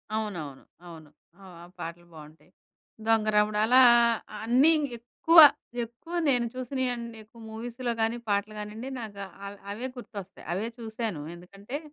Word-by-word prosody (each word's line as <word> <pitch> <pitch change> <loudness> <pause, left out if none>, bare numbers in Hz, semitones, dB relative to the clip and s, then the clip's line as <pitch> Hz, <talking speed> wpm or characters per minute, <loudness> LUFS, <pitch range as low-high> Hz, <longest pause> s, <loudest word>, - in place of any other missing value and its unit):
అవునవును. 170 -11 -4 0.2
అవును. 160 -3 -12 0.3
ఆ! - - -14 0.2
ఆ - - -10
పాటలు 170 +1 -7
బావుంటయి. 155 +3 -14 0.5
'దొంగరాముడు' 215 -1 +2
అలా 255 +3 +6 0.6
అన్నీ 255 +8 +5 0.3
ఎక్కువ, 245 +8 +1 0.5
ఎక్కువ 240 +9 -13 0.2
నేను 245 -3 +2
చూసినియన్నెక్కువ 240 -3 -4
మూవీస్‌లో 240 +2 -4
గానీ, 225 +2 +1
పాటలు 205 +1 0
గానీయండి, 215 +5 -6
నాకా 200 -3 -7 0.2
అవ్ 200 0 -9
అవే 240 +5 -4
గుర్తొస్తయి. 200 -5 -9
అవే 210 +5 -2
చూశాను. 220 -7 -4
ఎందుకంటే, 200 +9 -8
220 Hz, 120 wpm, -28 LUFS, 200-240 Hz, 0.6 s, అలా